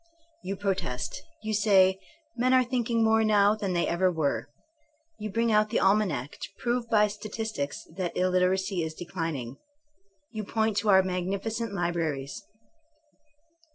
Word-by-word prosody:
Ton 195 +2 -4
protest. 185 -7 -2 0.2
Ton 215 - -1
say 190 -3 +4 0.4
men 255 +2 +3
are 255 - +5
thinking 240 -2 0
more 220 0 +4
now 205 -1 +4
than 205 -4 -2
they 170 -1 +1
ever 180 +2 +2
were. 140 -9 -1 0.7
You 215 0 -4
bring 230 +3 +1
out 215 0 +3
the 225 - +1
almanac 185 -10 +1
to - - -5
prove 240 -1 -1
by 210 -1 +4
statistics 210 -7 -4
that 180 -3 -3
illiteracy 185 +1 +1
is 160 -1 -4
declining. 165 -8 -4 0.7
You 220 -2 -4
point 220 0 0
to 210 +1 +1
our 190 -1 +6
magnificent 200 +4 -3
libraries. 160 -6 -2
195 Hz, 140 wpm, -28 LUFS, 175-220 Hz, 0.7 s, our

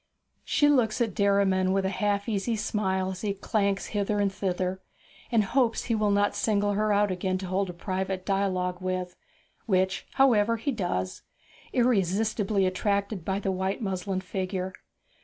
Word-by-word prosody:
She 290 - +3
looks 250 -7 +3
at 230 -5 0
Derriman 195 -2 +2
with 195 0 +1
a - - +1
half 200 +1 0
uneasy 220 +1 0
smile 190 -4 -1
as 185 0 -7
he 200 -2 -1
clanks 200 -1 0
hither 205 0 0
and 200 -1 +1
thither, 185 -1 -2 0.5
and 225 -3 +4
hopes 235 +2 +1
he 235 - -1
will 215 -1 +2
not 205 0 +2
single 205 -2 +1
her 210 +1 +1
out 205 -1 +3
again 185 +1 -1
to 190 - -6
hold 190 +1 -1
a - - -5
private 185 +1 -3
dialogue 185 -2 0
with 185 -1 -3 0.5
which, 190 -2 +1
however, 230 -4 +4
he 255 +6 -1
does, 175 - -2 0.5
irresistibly 210 -3 +1
attracted 200 0 -1
by 190 +3 -1
the 195 -1 -1
white 190 +4 -2
muslin 190 -1 -2
figure. 185 0 -3
195 Hz, 160 wpm, -27 LUFS, 185-210 Hz, 0.5 s, and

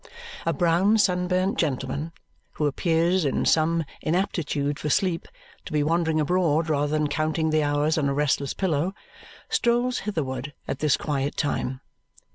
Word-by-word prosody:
A - - +4
brown 175 +6 +3
sunburnt 185 -1 +1
gentleman, 140 +1 -2 0.4
who 150 - -1
appears 165 +4 +1
in 140 -3 0
some 165 +1 +3 0.2
inaptitude 155 -4 -1
for 150 - -3
sleep 175 +2 +1 0.4
to - - -8
be 150 -1 +1
wandering 160 0 +1
abroad 160 0 +1
rather 145 -1 +1
than 150 -1 +1
counting 155 +1 0
the 155 0 +3
hours 145 +2 +1
on 140 -2 +1
a - - 0
restless 140 -1 0
pillow, 180 0 0 0.5
strolls 240 +1 +1
hitherward 140 -8 -3
at 135 - -3
this 150 -3 +2
quiet 145 -1 -2
time. 135 -3 -1
155 Hz, 145 wpm, -25 LUFS, 145-175 Hz, 0.5 s, A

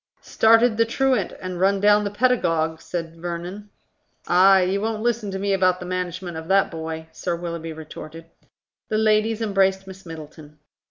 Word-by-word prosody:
"Started 225 0 +4
the 230 - +4
truant 265 +3 0
and 185 -1 -5
run 195 +1 +2
down 205 +1 +4
the - - -1
paedagogue," 170 -9 +1
said 165 -2 -6
Vernon. 175 +4 -6 0.6
"Ay, 190 +1 +6
you 190 +2 0
won't 220 0 -2
listen 235 -3 0
to 190 - -4
me 200 +1 0
about 185 -1 +2
the 180 - -7
management 180 -1 -4
of 160 0 -7
that 195 +1 +3
boy," 160 -1 -6
Sir 170 +2 -3
Willoughby 170 -1 -5
retorted. 160 +1 -10 0.6
The 215 - 0
ladies 220 +1 +2
embraced 195 -2 +1
Miss 190 0 -11
Middleton. 155 -2 -11
190 Hz, 165 wpm, -23 LUFS, 170-210 Hz, 0.6 s, Ay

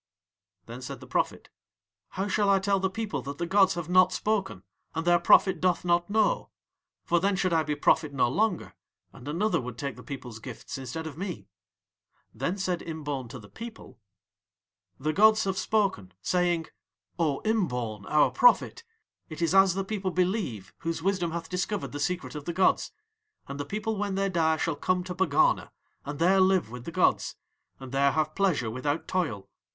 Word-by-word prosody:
Then 120 +2 -9
said 125 - -7
the - - -11
prophet: - - -2 0.7
"How 195 +2 0
shall 205 0 +1
I 195 - +5
tell 195 0 +1
the 190 0 0
people 220 +1 -3
that 140 +1 -7
the 170 - -2
gods 190 0 +4
have 175 -3 -4
not 185 +1 +5
spoken 205 +1 -1 0.3
and 160 +1 -2
their 175 0 +5
prophet 180 +1 +5
doth 180 -1 +1
not 175 +1 +2
know? 220 - +1 0.6
For 175 - +2
then 195 +2 +1
should 185 -2 0
I 165 - +4
be 150 -1 -2
prophet 150 +1 +2
no 135 -3 +2
longer, 200 - 0 0.4
and 125 - -12
another 175 +4 0
would 125 -2 -7
take 140 0 -4
the - - -10
people's 125 -5 -8
gifts 125 +2 -8
instead 135 +5 -5
of 160 0 -7
me." 185 - -5 0.8
Then 185 - -2
said 185 -3 -1
Imbaun 145 -6 -5
to 130 - -8
the 105 -4 -13
people: 225 - -10 1.0
"The 155 +3 -1
gods 220 +3 +5
have 195 -1 -1
spoken, 190 - 0
saying: 175 - +1 0.5
'O 150 -5 +1
Imbaun, 125 - -1
Our 150 - +4
prophet, - - +4 0.5
it 155 - -8
is 170 +1 +1
as 195 -2 +5
the 195 0 -2
people 195 -2 -2
believe 180 - -1
whose 165 0 -3
wisdom 185 -3 +1
hath 170 0 -5
discovered 185 +3 -3
the 145 - -5
secret 180 +5 -2
of 150 -2 -7
the 170 - -3
gods, 185 +2 +2 0.6
and 140 +1 -7
the 145 - -3
people 215 +5 -3
when 200 -2 -1
they 195 0 +1
die 160 -3 +2
shall 165 -1 -1
come 180 +4 0
to 180 0 -5
Pegana, 175 -5 +2 0.3
and 145 0 -6
there 185 +5 +4
live 185 -9 +3
with 125 0 -8
the - - -5
gods, 180 +2 +1 0.4
and 130 -2 -9
there 140 0 +3
have 155 0 0
pleasure 165 - +1
without 145 +6 -2
toil. 145 - -2
175 Hz, 185 wpm, -28 LUFS, 145-195 Hz, 1.0 s, I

